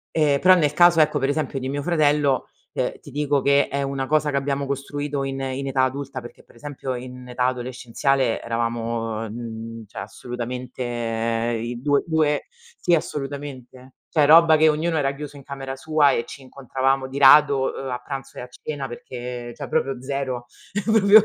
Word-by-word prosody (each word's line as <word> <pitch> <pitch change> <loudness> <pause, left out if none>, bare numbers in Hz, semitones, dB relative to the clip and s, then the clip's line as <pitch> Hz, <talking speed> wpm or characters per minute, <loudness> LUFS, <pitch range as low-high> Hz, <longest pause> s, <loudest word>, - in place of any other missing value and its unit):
Ehm, 145 -3 +3
però 185 0 +7
nel 150 -5 +2
caso, 175 +1 +6
ecco, 150 -1 +3
per 135 0 0
esempio, 145 -1 -1
di 130 0 -4
mio 145 +1 -2
fratello, 150 -4 +2 0.2
ehm, - - -2
ti - - -12
dico 145 -1 +1
che 140 +1 +4
è 140 0 -2
una 135 -1 -2
cosa, 150 +1 +2
che 140 - -1
abbiamo 140 0 -1
costruito 140 +1 -3
in 135 0 -3
in 135 +1 -3
età 135 -1 +1
adulta, 130 0 -2
perché, 120 -1 -12
per - - -23
esempio, 135 -1 -5
in 125 0 -8
età 125 0 -1
adolescenziale 125 0 0
eravamo, 115 -1 -2
uhm, 105 - -8
mhmm, 115 -1 -7
cioè, - - -11
assolutamente, 125 +1 -6 0.8
i 120 +1 -5
2- 145 +1 +2
2 155 -3 +1 0.3
sì, 175 - +3
assolutamente. 135 -4 -5 0.2
Cioè 155 -3 +3
robba, 160 +2 +7
che 155 0 +5
ognuno 160 +2 0
era 140 -2 +1
chiuso 145 0 -8
in 140 - -11
camera 135 -1 -6
sua 155 -1 +3
e 120 - 0
ci - - -10
incontravamo 135 0 -1
di 135 +1 -6
rado, 140 -1 +6
uhm, 135 -1 -5
a 125 0 -3
pranzo 135 +1 -7
e - - -4
a 125 - -8
cena, 140 +1 -6
perché 120 0 -7
cioè - - -7
proprio 135 -5 -1
0, 130 -2 -3 0.4
proprio. 215 -1 +7
135 Hz, 185 wpm, -23 LUFS, 125-145 Hz, 0.8 s, però